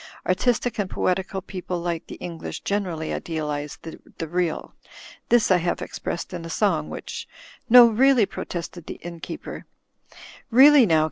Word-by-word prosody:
Artistic 240 Hz, +5 st, 0 dB
and 195 Hz, -2 st, -1 dB
poetical 190 Hz, +1 st, -1 dB
people 180 Hz, -2 st, -5 dB
like 170 Hz, -1 st, -3 dB
the -, -, -8 dB
English 170 Hz, -2 st, -7 dB
generally 180 Hz, -6 st, -2 dB
idealize 150 Hz, -3 st, -4 dB
the 165 Hz, 0 st, -8 dB
real. 175 Hz, 0 st, -2 dB, 0.6 s
This 235 Hz, -4 st, +4 dB
I 185 Hz, -, +6 dB
have 175 Hz, 0 st, -1 dB
ex -, -, -7 dB
pressed 170 Hz, -, -4 dB
in 175 Hz, -2 st, -5 dB
a 165 Hz, -, -7 dB
song, 165 Hz, -5 st, 0 dB
which -, -, -7 dB
— -, -, -18 dB
" 265 Hz, -, -39 dB
"No, 245 Hz, +1 st, +10 dB
really," 240 Hz, +1 st, +4 dB
protested 175 Hz, -2 st, -6 dB
the -, -, -5 dB
innkeeper, 170 Hz, -1 st, -7 dB, 0.8 s
"really 265 Hz, +1 st, +7 dB
now. 160 Hz, -3 st, +4 dB
180 Hz, 155 wpm, -24 LUFS, 165-220 Hz, 0.8 s, No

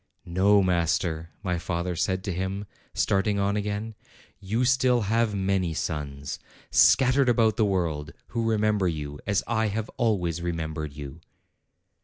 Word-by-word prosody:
"No, 100 Hz, +3 st, +4 dB
master," 85 Hz, -2 st, 0 dB
my 90 Hz, -3 st, -1 dB
father 85 Hz, +1 st, -2 dB
said 95 Hz, +2 st, -1 dB
to 100 Hz, -3 st, -2 dB
him, 95 Hz, +3 st, -3 dB, 0.3 s
starting 100 Hz, +1 st, +1 dB
on 100 Hz, +1 st, +1 dB
again; 105 Hz, +2 st, -3 dB, 0.5 s
"you 110 Hz, +5 st, 0 dB
still 125 Hz, -1 st, +3 dB
have 110 Hz, +1 st, +1 dB
many 95 Hz, -4 st, 0 dB
sons, 70 Hz, -4 st, -4 dB, 0.3 s
scattered 130 Hz, 0 st, +5 dB
about 115 Hz, -2 st, +3 dB
the 110 Hz, -, +2 dB
world, 80 Hz, -6 st, -1 dB, 0.2 s
who 115 Hz, -1 st, -1 dB
remember 105 Hz, -3 st, +2 dB
you, 75 Hz, -3 st, -4 dB
as 100 Hz, -2 st, +1 dB
I 110 Hz, -1 st, +1 dB
have 110 Hz, +1 st, -3 dB
always 90 Hz, -8 st, +1 dB
remem 85 Hz, -2 st, -3 dB
bered 75 Hz, -3 st, -5 dB
you." 75 Hz, +2 st, -8 dB
95 Hz, 145 wpm, -26 LUFS, 85-110 Hz, 0.5 s, scattered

